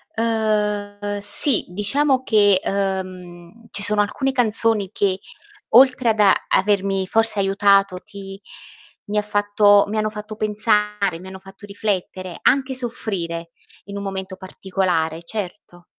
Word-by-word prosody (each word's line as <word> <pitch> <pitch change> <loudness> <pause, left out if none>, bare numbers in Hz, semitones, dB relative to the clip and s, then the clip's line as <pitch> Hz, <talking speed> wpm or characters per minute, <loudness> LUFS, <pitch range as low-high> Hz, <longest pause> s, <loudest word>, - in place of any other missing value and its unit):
Ehm, 210 -2 -2
sì, 205 +5 +6
diciamo 260 +8 0
che, 205 -4 +3
ehm, 185 +1 -5
ci 200 - -2
sono 210 0 +3
alcune 265 +6 -2
canzoni 225 -5 +1
che, 195 -3 -1 0.5
oltre 250 0 +4
ad 220 -1 -1 0.3
avermi 195 -1 0
forse 225 0 +1
aiutato 195 -1 +2
ti 195 -1 -11 0.7
mi 210 +1 -4
ha - - +3
fatto 205 0 +3
mi 215 +2 -4
hanno 215 0 0
fatto 210 0 -8
pensare, 210 -3 0
mi 185 - -12
hanno 190 0 -10
fatto 195 +2 -14
riflettere, 190 -3 -4
anche 265 0 +1
soffrire 185 -9 -4 0.3
in 200 0 -8
un 200 - -6
momento 190 -1 -6
particolare, 185 -4 -3
certo. 180 -2 -8
205 Hz, 130 wpm, -20 LUFS, 190-215 Hz, 0.7 s, sì